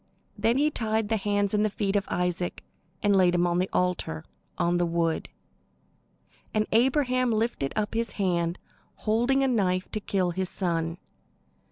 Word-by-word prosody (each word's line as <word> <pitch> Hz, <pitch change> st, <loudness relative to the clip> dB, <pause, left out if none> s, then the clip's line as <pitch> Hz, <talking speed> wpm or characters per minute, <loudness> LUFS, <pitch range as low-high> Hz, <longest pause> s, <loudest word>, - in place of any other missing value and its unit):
Then 225 Hz, +4 st, +2 dB
he 300 Hz, +2 st, +3 dB
tied 220 Hz, -4 st, -1 dB
the 225 Hz, -, +2 dB
hands 205 Hz, 0 st, 0 dB
and 210 Hz, 0 st, +3 dB
the 215 Hz, -, +2 dB
feet 200 Hz, -1 st, -2 dB
of 200 Hz, -1 st, +1 dB
Isaac, 180 Hz, 0 st, -2 dB, 0.4 s
and 205 Hz, -1 st, +4 dB
laid 180 Hz, -2 st, +4 dB
him 175 Hz, 0 st, +3 dB
on 175 Hz, 0 st, +1 dB
the 185 Hz, -, 0 dB
altar, 180 Hz, -, -1 dB, 0.3 s
on 175 Hz, +1 st, +2 dB
the 175 Hz, -, +2 dB
wood. 165 Hz, -1 st, 0 dB, 1.3 s
And 215 Hz, 0 st, +2 dB
Abraham 255 Hz, +1 st, +3 dB
lifted 220 Hz, -11 st, 0 dB
up 210 Hz, -1 st, -1 dB
his 230 Hz, +1 st, -1 dB
hand, 175 Hz, -3 st, 0 dB, 0.4 s
holding 240 Hz, +5 st, +1 dB
a -, -, +3 dB
knife 185 Hz, -7 st, +1 dB
to 215 Hz, -, -2 dB
kill 190 Hz, -3 st, 0 dB
his 185 Hz, +1 st, -2 dB
son. 165 Hz, -2 st, -1 dB
200 Hz, 165 wpm, -27 LUFS, 175-225 Hz, 1.3 s, and